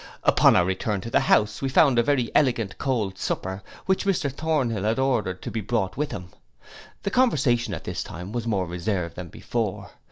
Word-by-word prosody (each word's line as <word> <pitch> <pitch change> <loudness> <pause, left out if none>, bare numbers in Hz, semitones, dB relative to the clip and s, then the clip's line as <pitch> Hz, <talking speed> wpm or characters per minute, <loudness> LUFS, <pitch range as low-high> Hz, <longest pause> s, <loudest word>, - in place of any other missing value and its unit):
Upon - - +5
our 90 - +4
return 95 +2 -1
to 115 - -7
the - - +4
house, 105 0 +2
we 135 - 0
found 130 -2 +5
a - - +7
very 130 -2 +1
elegant 120 -9 +2
cold 110 -8 -1
supper, 95 +1 -3 0.2
which 190 0 +1
Mr 175 -8 0
Thornhill 135 -8 -1
had 110 +3 0
ordered 120 -9 0
to - - -5
be 110 - -2
brought 105 -2 -1
with 150 +1 -1
him. 90 -2 -7 0.7
The 200 - -1
conversation 130 - +2
at - - -8
this - - -4
time 90 +4 -8
was 120 0 -3
more 100 -5 0
reserved 90 0 -3
than 90 -1 -6
before. - - -4
115 Hz, 195 wpm, -25 LUFS, 95-135 Hz, 0.7 s, a